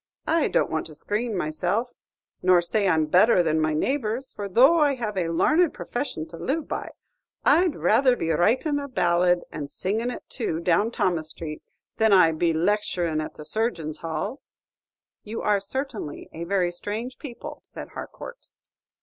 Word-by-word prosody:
I 330 -1 +2
don't - - +1
want 160 - -2
to 155 - -11
screen 210 +6 -2
myself, 180 +9 -1 0.5
nor 180 -1 +5
say 200 +4 0
I'm 160 -3 +3
better 180 +4 +5
than 160 -1 +1
my 155 0 +1
neighbors, 255 - -1
for 200 -1 -6
though 265 - +6
I 290 -2 +3
have 220 -5 -4
a 180 -3 0
larned 305 - +3
profession 240 - -4
to 170 - -9
live 295 - -2
by, - - -4 0.6
I 335 +6 +5
'd 315 - -3
rather 250 +3 +3
be 165 -8 -1
writin' 245 - +2
a 280 - -5
ballad, 175 -6 +2
and 145 -2 -5
singin' 220 +10 -1
it 250 - -6
too, 215 -10 -3
down 175 +6 +2
Thomas 170 -8 -1
Street, 155 -1 -7 0.4
than 220 -2 +4
I 180 -4 +6
'd 155 - -7
be 170 -1 +3
lecturin' 170 -2 0
at 155 - -6
the 150 - -10
Surgeons' 170 -7 -2
Hall." 165 - -4 0.8
"You 220 +2 -6
are 210 -1 +3
certainly 225 - -5
a 165 +1 -5
very 180 -1 +1
strange 215 +8 -5
people," 255 -6 -8
said - - -9
Harcourt. - - -9
200 Hz, 175 wpm, -25 LUFS, 165-245 Hz, 0.8 s, though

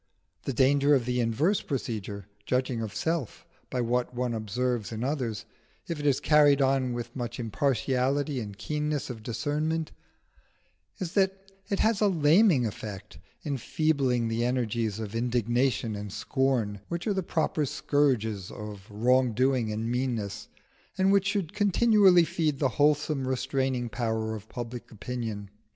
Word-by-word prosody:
The 135 - -1
danger 140 +3 +4
of 125 -4 0
the 125 0 0
inverse 135 - +1
procedure, 105 - -4 0.2
judging 125 -2 0
of 110 -2 -5
self 160 -7 -2 0.2
by 125 - -1
what 125 +1 -1
one 125 -1 -1
observes 115 +1 -2
in 110 +1 -4
others, 130 -6 -2 0.4
if 165 -3 -3
it 145 - -1
is 140 - +3
carried 145 -2 +5
on 135 -2 +2
with 120 -1 -6
much 120 -1 -4
impartiality 135 +4 0
and 100 -4 -6
keenness 150 +4 -2
of 115 -3 -8
discernment, 150 +8 -2 1.1
is 180 -1 -4
that 195 -1 0 0.2
it 200 - 0
has 220 -1 +2
a 210 - +5
laming 165 - +4
effect, 105 -1 -7 0.3
enfeebling 135 -3 0
the 115 +1 -1
energies 115 -4 0
of 110 -2 -5
indignation 120 -1 0
and 105 -1 -6
scorn, 125 -5 0
which 170 0 -4
are 210 - +1
the 190 - 0
proper 160 -3 0
scourges 120 -9 0
of 105 -2 -8
wrong 125 +3 +2
doing 125 -1 +1
and 110 +2 -2
meanness, 115 -5 -2 0.5
and 190 +1 +3
which 200 -1 +3
should 195 -6 -1
continually 205 -3 +5
feed 160 -3 0
the 135 -2 +2
wholesome 145 0 +1
restraining 130 -1 -1
power 110 -2 -2
of 110 0 -8
public 120 0 -6
opinion. 110 -2 -5
125 Hz, 145 wpm, -28 LUFS, 115-150 Hz, 1.1 s, carried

